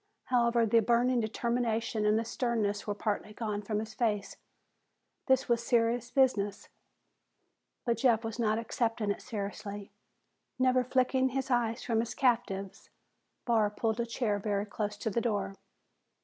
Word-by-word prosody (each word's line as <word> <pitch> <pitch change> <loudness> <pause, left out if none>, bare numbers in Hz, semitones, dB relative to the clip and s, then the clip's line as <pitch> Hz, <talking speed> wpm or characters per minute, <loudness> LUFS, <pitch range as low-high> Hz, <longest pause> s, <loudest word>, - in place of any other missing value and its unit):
However, 235 -2 +3
the 230 +1 +4
burning 240 +2 +3
determination 230 -1 -1
and 210 +1 +4
the 225 - -1
sternness 220 -4 -1
were 205 - -1
partly 210 0 -2
gone 210 -2 -3
from 210 +1 -2
his 220 +1 -4
face. 210 -3 -1 0.9
This 265 -1 +3
was 235 -2 +2
a - - -10
serious 235 0 +2
business 215 -7 +1 1.2
but 235 -2 +1
Jeff 230 -2 +3
was 225 +1 -5
not 215 -2 +2
accepting 230 -2 -1
it - - -4
seriously. 205 -1 -6 0.7
Never 255 0 +3
flicking 260 +1 +2
his 265 +1 -3
eyes 235 -1 +1
from 225 -2 +1
his 230 0 -2
captives, 225 -7 0 0.6
Barr 225 -4 +3
pulled 220 +2 -2
a 235 - 0
chair 225 -3 -1
very 200 0 -1
close 210 0 -4
to 220 - -2
the 235 - 0
door. 210 -4 -1
230 Hz, 150 wpm, -31 LUFS, 210-240 Hz, 1.2 s, the